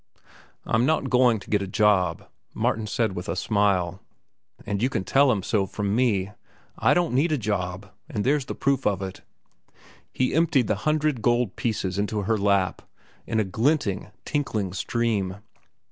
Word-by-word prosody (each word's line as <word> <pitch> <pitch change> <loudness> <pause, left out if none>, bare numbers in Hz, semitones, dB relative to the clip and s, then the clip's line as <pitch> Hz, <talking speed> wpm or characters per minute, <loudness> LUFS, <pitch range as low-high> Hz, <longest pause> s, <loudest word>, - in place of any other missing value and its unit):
"I'm 115 - +2
not 155 -4 +1
going 125 -3 +4
to - - -13
get 105 -2 +2
a 100 - -3
job," 95 -4 +2 0.3
Martin 110 -1 0
said 110 -1 0
with 90 - -5
a - - -1
smile. 100 -4 +1 0.7
"And 100 0 -2
you 125 - +2
can 95 - -2
tell 135 +5 +4
him 100 -5 -1
so 100 -2 0
from 100 +2 -2
me. 105 -6 +1 0.5
I - - +4
don't 175 -4 +1
need 145 +6 +2
a 155 - +2
job, 95 -3 -3 0.2
and 105 - -2
there's 140 +2 +1
the - - -5
proof 140 -1 +1
of 100 -2 0
it." 95 -1 -7 0.9
He 130 - 0
emptied 160 -6 +3
the 105 - +1 0.2
hundred 155 -5 +1
gold 120 -2 +1
pieces 100 -6 -2
into 105 0 -1
her 110 +2 0
lap 100 -2 +1 0.5
in 110 - 0
a - - +3
glinting, 110 - 0 0.2
tinkling 110 -10 -2
stream. 105 -2 -1
105 Hz, 170 wpm, -25 LUFS, 95-125 Hz, 0.9 s, going